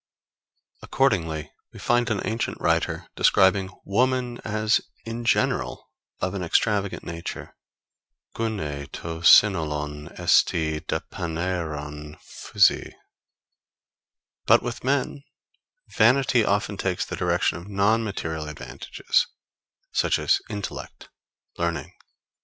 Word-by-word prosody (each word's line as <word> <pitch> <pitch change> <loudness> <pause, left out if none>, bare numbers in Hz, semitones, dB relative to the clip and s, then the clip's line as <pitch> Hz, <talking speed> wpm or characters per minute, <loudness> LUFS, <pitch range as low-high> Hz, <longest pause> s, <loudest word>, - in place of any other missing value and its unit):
Accordingly 80 - 0 0.2
we - - -13
find 120 0 +1
an 105 -3 0
ancient 115 +1 -2
writer - - 0
describing 95 0 +4 0.2
woman 125 +3 0
as 110 +1 +1 0.2
in 115 +1 -5
general - - 0 0.3
of 90 +1 -2
an 100 - -3
extravagant 100 +3 0
nature 85 0 -7 0.8
[Greek: 115 0 -1
Gynae 75 -9 -5
to 80 -1 -6
synolon 75 -6 +4
esti 80 -2 +3
dapanaeron 80 -4 -4
Physei] 100 -2 +1 1.5
But - - +6
with 120 -1 -5
men 140 +1 0 0.7
vanity 125 +1 +4
often 100 0 0
takes 95 -2 -1
the - - -5
direction - - +1
of 85 - -12
non 105 +3 +2
material 80 -7 -4
advantages, 75 - -1 0.6
such - - +2
as - - +2
intellect, 100 -2 -7 0.5
learning, 85 -1 -1
courage. - - -32
95 Hz, 105 wpm, -25 LUFS, 80-110 Hz, 1.5 s, But